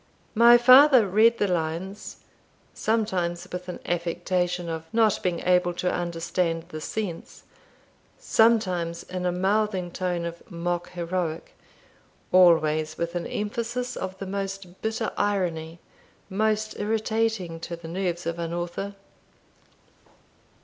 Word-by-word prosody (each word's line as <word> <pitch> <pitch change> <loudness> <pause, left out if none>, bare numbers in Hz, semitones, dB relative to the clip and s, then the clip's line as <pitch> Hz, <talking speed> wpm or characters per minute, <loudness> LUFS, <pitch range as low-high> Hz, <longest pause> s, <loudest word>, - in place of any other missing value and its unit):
My 235 +1 +8
father 255 -1 +7
read 220 +5 +4
the 205 - +1
lines 175 +3 -3 0.5
sometimes 190 -6 -1
with 180 0 -6
an 180 - -6
affectation 175 +1 -1
of 165 0 -6
not 225 -3 +2
being 175 -2 -1
able 180 -1 +2
to 180 +1 -1
understand 170 -1 -1
the 155 -2 -7
sense 195 -2 -5 0.7
sometimes 185 -7 +2
in 180 0 -4
a - - +1
mouthing 190 0 0
tone 175 -1 -2
of 170 0 -6
mock 175 -1 -3
heroic 170 -2 -3 0.8
always 155 -3 +4
with 170 0 -3
an 175 -1 -3
emphasis 240 +4 -3
of 190 0 -5
the 195 - -6
most 195 -1 -5
bitter 220 0 -2
irony, 175 -5 -1 0.5
most 215 +2 0
irritating 220 -4 -1
to 170 +1 -6
the 165 -1 -11
nerves 180 0 -3
of 170 0 -3
an 170 0 -3
author. 175 +4 -4
180 Hz, 120 wpm, -25 LUFS, 170-210 Hz, 0.8 s, My